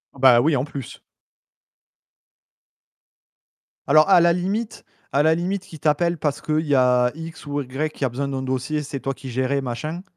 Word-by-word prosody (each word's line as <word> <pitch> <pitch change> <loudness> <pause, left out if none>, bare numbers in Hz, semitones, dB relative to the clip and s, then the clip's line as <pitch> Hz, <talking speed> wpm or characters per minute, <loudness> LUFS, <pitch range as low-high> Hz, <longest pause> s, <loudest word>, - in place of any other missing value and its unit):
Oh - - -14
bah, 125 -2 +7
oui, 150 +1 +2
en 130 - 0
plus. 140 -3 -8 2.9
Alors, 155 +6 +5
à 175 -3 +7
la 170 0 +5
limite, 200 +6 -3 0.3
à 145 +2 +2
la 160 +1 +4
limite 185 +2 -2
qu'ils 160 -5 -12
t'appellent 165 +3 +1
parce 145 -2 -2
qu'il 155 0 0
y 145 - +2
a 125 -1 +3
X 160 -1 -9
ou 145 0 -3
Y 135 +4 -3
qui 140 - -3
a - - 0
besoin 140 +4 -3
d'un 135 -1 -3
dossier, 130 +4 -2
c'est 140 -2 -6
toi 135 - -2
qui 130 0 -10
gérais 130 +3 -1
machin 155 +8 -5
145 Hz, 185 wpm, -22 LUFS, 130-160 Hz, 2.9 s, bah